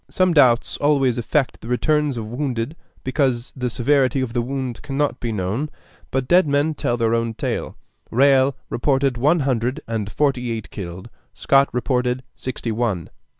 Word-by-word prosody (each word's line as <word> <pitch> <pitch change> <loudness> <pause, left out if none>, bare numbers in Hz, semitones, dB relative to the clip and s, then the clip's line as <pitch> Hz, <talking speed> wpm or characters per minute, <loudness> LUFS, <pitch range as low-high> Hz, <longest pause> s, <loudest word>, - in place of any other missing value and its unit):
Some 185 -1 +2
doubts 125 -6 +4
always 135 -4 +2
affect 135 +4 0
the - - -9
returns 150 +2 +1
of 110 - -4
wounded, 125 +2 -3 0.3
because 130 -2 0
the 125 -1 -2
severity 130 +2 +2
of 130 -3 -2
the 120 - +1
wound 130 -1 -4
cannot 145 0 -1
be 120 - -3
known; 105 +9 -2 0.4
but 135 -1 -1
dead 180 +1 +5
men 145 +2 +2
tell 120 -4 -1
their 115 -1 +1
own 115 -1 0
tale. - - -3 0.3
Riall 135 +1 +4
reported 135 +1 +1
one 150 +7 +3
hundred 130 +1 0
and 110 -3 -3
forty 130 -4 0
eight 110 -6 -4
killed; 90 -2 -7 0.3
Scott 140 0 +3
reported 125 +1 0
sixty 125 -2 -4
one. 110 -6 -2
130 Hz, 160 wpm, -21 LUFS, 115-140 Hz, 0.4 s, dead